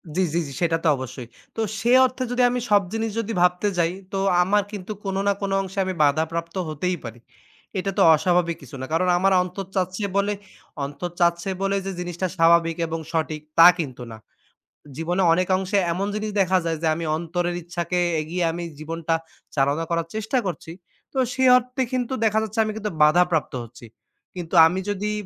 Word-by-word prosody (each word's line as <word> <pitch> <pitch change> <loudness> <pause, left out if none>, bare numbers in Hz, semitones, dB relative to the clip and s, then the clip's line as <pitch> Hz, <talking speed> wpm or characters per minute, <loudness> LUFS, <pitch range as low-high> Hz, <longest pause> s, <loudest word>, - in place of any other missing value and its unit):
জি, 190 - +2
জি, 170 - +2
জি, - - -8
সেটা 165 -1 +2
তো - - +2
অবশ্যই। 130 -2 -7 0.3
তো 225 - -2 0.2
সে 235 +3 +1
অর্থে 255 0 -3
যদি 245 - +1
আমি 245 0 -1
সব 205 -1 +5
জিনিস 225 0 -1
যদি 225 0 -3
ভাবতে 180 +3 +2
যাই, 170 0 +2 0.2
তো 195 - 0 0.2
আমার 205 +2 +2
কিন্তু 205 0 -7
কোন 195 -1 -3
না 200 - +4
কোন 200 - -2
অংশে 195 +1 -5
আমি 185 - -2
বাধাপ্রাপ্ত 160 +4 0
হতেই 175 +4 -2
পারি। 120 0 -8 0.6
এটা 195 +1 -2
তো - - +3
অস্বাভাবিক 175 0 +1
কিছু 140 0 -11
না। - - -3
কারণ 180 +3 +2
আমার 195 +2 +3
অন্তর 185 +2 -6
চাচ্ছে 185 +2 -1
বলে 200 +1 +1 0.5
অন্তর 155 +5 -6
চাচ্ছে 170 +1 +2
বলে 195 0 +1
যে, 195 - -3
জিনিসটা 175 +1 -3
স্বাভাবিক 165 -1 +4
এবং 165 0 -3
সঠিক 155 -2 -2 0.2
তা 165 - +10
কিন্তু 130 -6 -4
না। 110 - -9 0.8
জীবনে 175 +4 -1
অনেক 180 +2 +1
অংশে 190 +1 -1 0.2
এমন 195 +3 -2
জিনিস 210 0 -3
দেখা 185 0 +3
যায় 165 -1 -1
যে, 165 - +1
আমি 165 - -4
অন্তরের 175 +1 -2
ইচ্ছাকে 175 0 -2 0.2
এগিয়ে 170 +4 -3
আমি 170 +1 -5 0.2
জীবনটা 165 +1 -2 0.4
চালনা 140 +4 +1
করার 170 -1 -1
চেষ্টা 220 +4 -1
করছি। 170 -2 -5 0.4
তো - - -6 0.2
সেই 260 -1 +3
অর্থে 250 +1 -3
কিন্তু 255 0 -1
দেখা 220 0 +3
যাচ্ছে 220 +1 -4
আমি 215 - -2
কিন্তু 210 -2 -3
বাধাপ্রাপ্ত 165 +1 +3
হচ্ছি 120 +1 -13 0.5
কিন্তু 175 0 -5
আমি 180 +3 +1
যদি 205 +1 -2
180 Hz, 190 wpm, -23 LUFS, 165-200 Hz, 0.8 s, তা